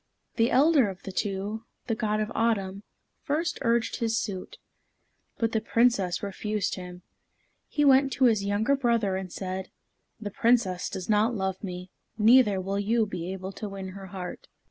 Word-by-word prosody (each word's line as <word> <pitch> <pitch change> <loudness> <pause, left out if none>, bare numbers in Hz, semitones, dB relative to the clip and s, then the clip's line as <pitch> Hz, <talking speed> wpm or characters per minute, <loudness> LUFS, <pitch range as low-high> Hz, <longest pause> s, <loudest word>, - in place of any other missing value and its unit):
The 230 +1 +4
elder 275 -3 +4
of 190 -1 -9
the 195 - -6
two, 205 +3 -3 0.2
the 230 - -1
God 215 -1 0
of 215 +1 -2
Autumn, 200 -4 0 0.4
first 325 +3 -1
urged 235 -2 +1
his 225 -1 0
suit. 190 -5 -4 0.8
But 230 -1 0
the 220 - 0
Princess 215 -8 +2
refused 205 +1 -2
him. 180 -1 -8 0.6
He 295 - +1
went 270 0 +5
to 260 - 0
his 220 -4 +3
younger 205 +7 +2
brother 235 -7 +1
and 190 -1 -5
said, 190 0 -5 0.5
"The 205 -2 -5
Princess 220 -6 +2
does 185 - -6
not 220 +3 +3
love 190 -1 -2
me, 180 -1 -6 0.3
neither 220 -2 +5
will 195 +2 -2
you 220 +2 +2
be 180 -3 -5
able 190 0 -5
to 210 +1 -6
win 195 -1 -6
her 195 +1 -9
heart." 185 -2 -7
210 Hz, 165 wpm, -27 LUFS, 190-230 Hz, 0.8 s, went